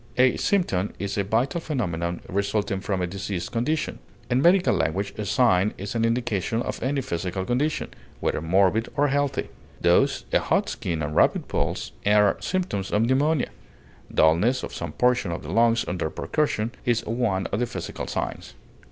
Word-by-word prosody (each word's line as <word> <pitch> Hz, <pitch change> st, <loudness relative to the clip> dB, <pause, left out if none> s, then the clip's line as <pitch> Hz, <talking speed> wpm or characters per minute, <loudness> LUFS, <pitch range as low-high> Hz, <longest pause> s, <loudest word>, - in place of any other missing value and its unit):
A 125 Hz, 0 st, +5 dB
symptom 105 Hz, -, 0 dB
is 100 Hz, 0 st, -3 dB
a 100 Hz, -, +1 dB
vital 120 Hz, -, 0 dB
phenomenon 85 Hz, -, -2 dB
resulting 100 Hz, 0 st, -1 dB
from 95 Hz, -1 st, -2 dB
a -, -, +2 dB
diseased 95 Hz, -1 st, -4 dB
condition; 150 Hz, +7 st, -1 dB, 0.3 s
in 125 Hz, +2 st, +3 dB
medical 180 Hz, +3 st, +5 dB
language 100 Hz, +5 st, -1 dB
a 105 Hz, -, -4 dB
sign 105 Hz, -4 st, +3 dB
is 100 Hz, +1 st, -5 dB
an 115 Hz, -1 st, +1 dB
indication 115 Hz, -1 st, 0 dB
of -, -, -5 dB
any 135 Hz, +2 st, 0 dB
physical 95 Hz, -4 st, -3 dB
condition, 140 Hz, +7 st, 0 dB, 0.3 s
whether -, -, -1 dB
morbid 95 Hz, +7 st, +2 dB
or 145 Hz, +1 st, +3 dB
healthy; 145 Hz, 0 st, 0 dB, 0.3 s
thus, -, -, +3 dB
a -, -, +5 dB
hot -, -, +1 dB
skin 80 Hz, -3 st, -3 dB
and 75 Hz, +1 st, -3 dB
rapid -, -, +3 dB
pulse -, -, -2 dB
are 105 Hz, 0 st, +4 dB
symptoms 175 Hz, -, -2 dB
of 105 Hz, -, +2 dB
pneumonia; 140 Hz, +3 st, +2 dB, 0.6 s
dulness 95 Hz, +12 st, +3 dB
of -, -, -6 dB
some -, -, -5 dB
portion 125 Hz, -7 st, +2 dB
of 85 Hz, -, -5 dB
the 75 Hz, -, -6 dB
lungs 115 Hz, +2 st, +3 dB
under 90 Hz, -3 st, -2 dB
percussion 120 Hz, -, -1 dB
is 120 Hz, -2 st, +1 dB
one 110 Hz, -5 st, 0 dB
of 100 Hz, -, 0 dB
the 120 Hz, -, 0 dB
physical -, -, -5 dB
signs. -, -, -4 dB
110 Hz, 170 wpm, -25 LUFS, 95-125 Hz, 0.6 s, A